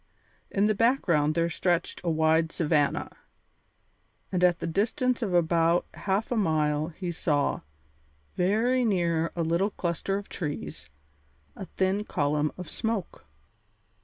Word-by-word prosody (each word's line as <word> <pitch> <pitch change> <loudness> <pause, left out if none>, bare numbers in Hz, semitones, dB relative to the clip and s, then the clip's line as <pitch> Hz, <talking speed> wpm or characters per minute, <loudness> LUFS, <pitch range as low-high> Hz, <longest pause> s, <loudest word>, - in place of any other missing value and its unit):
In 200 +1 +1
the 215 - +3
background 180 - +2
there 170 0 +2
stretched 175 0 -1
a 175 - 0
wide 160 0 +2
savanna, 150 -3 0 1.2
and 180 -1 0
at 175 -1 +4
the - - -5
distance 235 - 0
of 215 -5 -1
about 170 0 +3
half 200 +4 -2
a - - +1
mile 155 -6 +1
he 175 +1 -5
saw, 150 -4 0 0.7
very 225 +8 +2
near 170 -6 +1
a 170 - 0
little 170 +5 +1
cluster 190 +1 -2
of 200 - -7
trees, 80 - -6 0.7
a 195 - -7
thin 190 +2 +1
column 150 -4 0
of 180 -2 -7
smoke. 210 - -4
175 Hz, 135 wpm, -27 LUFS, 160-200 Hz, 1.2 s, at